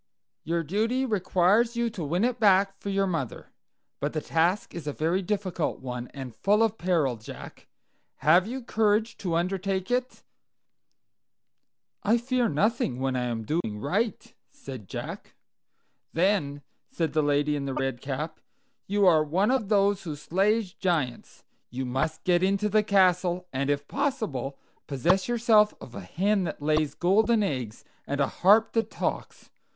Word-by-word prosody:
"Your 165 +2 -1
duty 225 - 0
requires 205 +2 +2
you 235 -1 0
to 185 -6 -6
win 170 +7 0
it 245 0 0
back 195 -2 +4
for 200 - -5
your 195 0 +1
mother. 165 - -4 0.5
But 145 +1 -2
the 155 - 0
task 170 +6 0
is 165 -4 -7
a 145 - -2
very 165 +6 0
difficult 185 -4 -2
one, 125 -1 -5
and 130 -5 -9
full 210 - +3
of 225 -1 0
peril, 160 -9 +1
Jack. 110 - -11 0.5
Have 175 +5 +4
you 255 +2 -5
courage 220 0 +1
to 175 -4 -2
undertake 190 +3 -1
it?" 250 +1 -2 1.8
"I 220 +3 +3
fear 245 0 0
nothing 195 - 0
when 130 0 -1
I 125 -1 -1
am 115 -2 -3
doing 110 -4 -2
right," 195 - -2 0.2
said 130 -8 -10
Jack. - - -7 0.8
"Then," 165 -6 +1 0.3
said 165 -3 -2
the 155 - +3
lady 145 0 +1
in 140 -1 -3
the 135 -1 -3
red 135 -2 -2
cap, 150 +4 -4 0.5
"you 205 0 +2
are 160 -4 +5
one 185 +9 +1
of 250 -7 0
those 200 -1 +3
who 160 -5 -5
slay 195 +9 +1
giants. 170 - -3 0.3
You 130 +2 -4
must 135 +6 -2
get 175 -1 +3
into 200 +2 +1
the 215 +1 +4
castle, 185 -3 +2
and 135 +2 -1
if 145 0 -1
possible 215 - -2 0.3
possess 170 +8 +1
yourself 225 -3 +4
of 120 - -11
a - - -6
hen 190 - 0
that 160 - -5
lays 155 0 0
golden 215 +5 +3
eggs, 125 - -4 0.2
and 140 +1 -2
a 140 - +4
harp 210 +9 +4
that 225 -1 0
talks. - - -4
180 Hz, 160 wpm, -27 LUFS, 145-210 Hz, 1.8 s, are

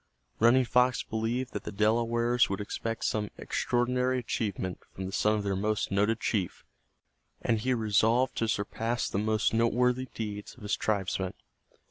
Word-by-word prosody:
Running 120 +3 +5
Fox 125 +2 +3
believed 115 +3 -2
that - - -4
the - - -5
Delawares 115 +3 +2
would 100 - -2
expect 115 +2 -3
some 105 -1 0
extraordinary 125 +1 0
achievement 100 -6 -2 0.2
from 95 - -5
the 95 - -5
son 105 +2 +2
of 105 - -2
their 100 -1 0
most 105 +2 -1
noted 105 +3 +2
chief, 95 -6 -2 0.7
and 115 -2 +1
he 125 +3 +1
resolved 115 +3 +2
to 115 - +1
surpass 115 +3 -1
the 100 - -1
most 110 +1 +1
noteworthy 125 +3 +2
deeds 105 -2 -5
of 125 - -15
his 105 - 0
tribesmen. 95 -3 -1
110 Hz, 155 wpm, -29 LUFS, 105-120 Hz, 0.7 s, Running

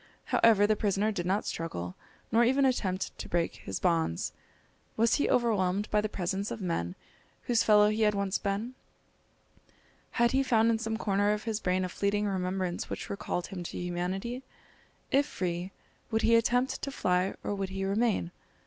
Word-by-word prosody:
However, 215 -3 +5
the 215 +1 +3
prisoner 205 +1 +1
did 175 -4 -3
not 195 +3 +1
struggle, 90 - -4 0.4
nor 230 +1 +5
even 265 +3 +3
attempt 190 -8 -1
to - - -6
break 170 -1 0
his 95 - -5
bonds. 165 - 0 0.6
Was 230 +1 +3
he - - +1
overwhelmed 205 -4 +1
by 210 - +3
the 215 - -2
presence 195 +1 -2
of - - -5
men 165 - -2 0.5
whose 235 -2 +2
fellow 210 -1 +6
he 215 +1 -1
had 210 -1 +3
once 200 -1 0
been? 205 +5 -2 1.4
Had 235 0 +3
he 265 +1 +3
found 230 -3 +3
in 225 - 0
some 225 0 -2
corner 205 -1 +1
of 210 - -4
his 220 -2 -2
brain 185 -1 0
a - - -4
fleeting 205 +2 0
remembrance 185 -2 -2
which - - -5
recalled 180 -3 -3
him 185 -2 -6
to 175 - -6
humanity? 180 +8 -3 0.7
If 285 +2 +3
free, 180 -2 -3 0.4
would 220 -1 0
he 230 - +5
attempt 245 +3 +2
to - - -3
fly, 185 -7 0
or - - -2
would 195 -1 -3
he 195 0 -3
remain? 200 -3 +1
200 Hz, 175 wpm, -30 LUFS, 185-225 Hz, 1.4 s, fellow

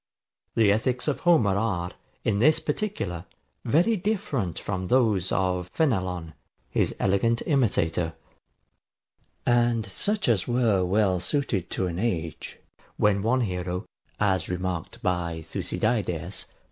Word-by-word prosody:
The 110 -3 +5
ethics 125 +5 0
of 150 - 0
Homer 120 - +4
are, 95 -5 -1 0.3
in 100 - +1
this 155 +7 +5
particular, 150 - -3 0.4
very 175 - +3
different 160 - -1
from 95 -2 -3
those 110 -7 +2
of 90 -1 0
Fenelon, 90 - 0 0.4
his - - +1
elegant 115 +5 +2
imitator; 90 - +1 1.3
and 120 -2 +3
such 205 - -1
as 110 -7 +2
were 120 -6 +2
well 95 0 +2
suited 100 - -1
to 95 - -1
an 85 -1 -3
age, 85 -8 -3 0.4
when 100 -1 +3
one 125 +5 +2
hero, 90 -2 -2 0.3
as 95 -4 +1
remarked 90 +5 -3
by 85 -4 -1
Thucydides 95 0 -2
[Lib. - - -31
100 Hz, 120 wpm, -26 LUFS, 90-120 Hz, 1.3 s, The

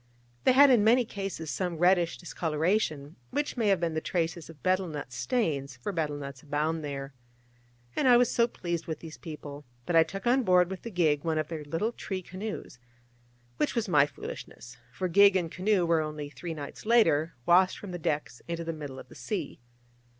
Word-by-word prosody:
They - - +6
had 280 +1 +8
in 235 -5 +5
many 240 +3 +5
cases 195 -7 -5
some 180 -3 -2
reddish 175 0 +3
discoloration, 160 -3 -1
which 290 0 -2
may 230 -4 0
have 195 -3 +4
been 170 -1 -1
the 160 - -1
traces 165 -2 -2
of 150 -5 -14
betel 185 0 +2
nut 145 -5 -6
stains: 140 - -1
for 125 +11 -4
betel 155 -5 -2
nuts 140 -2 -8
abound 155 +2 -1
there. 140 -1 -5 0.8
And 270 - +2
I 245 -1 +8
was 245 -1 +3
so 235 0 +3
pleased 170 -7 -4
with 160 -2 -4
these 160 -2 -10
people, 150 -3 -8 0.2
that 175 - -1
I 165 - +8
took 195 +6 -3
on 250 +3 +4
board 180 -4 +4
with 190 - -5
the 230 - -6
gig 160 -7 +1
one 160 -2 0
of 155 -1 -1
their 160 -3 -5
little 165 +10 -1
tree 190 -5 -5
canoes: 190 -8 -7 0.8
which 150 - 0
was 230 -2 0
my 145 -5 +5
foolishness: 125 -3 -9 0.2
for 185 - -2
gig 200 +3 +6
and 170 -3 0
canoe 190 -1 +1
were 165 -1 +3
only 150 -1 -5
three 165 +1 -6
nights 145 +7 -8
later 170 -9 +3
washed 185 +2 +5
from 200 - -8
the 175 - -5
decks 145 -6 -2
into 170 0 -3
the 165 0 -3
middle 145 -4 -7
of - - -10
the - - -15
sea. 185 -10 -4
165 Hz, 200 wpm, -29 LUFS, 150-195 Hz, 0.8 s, had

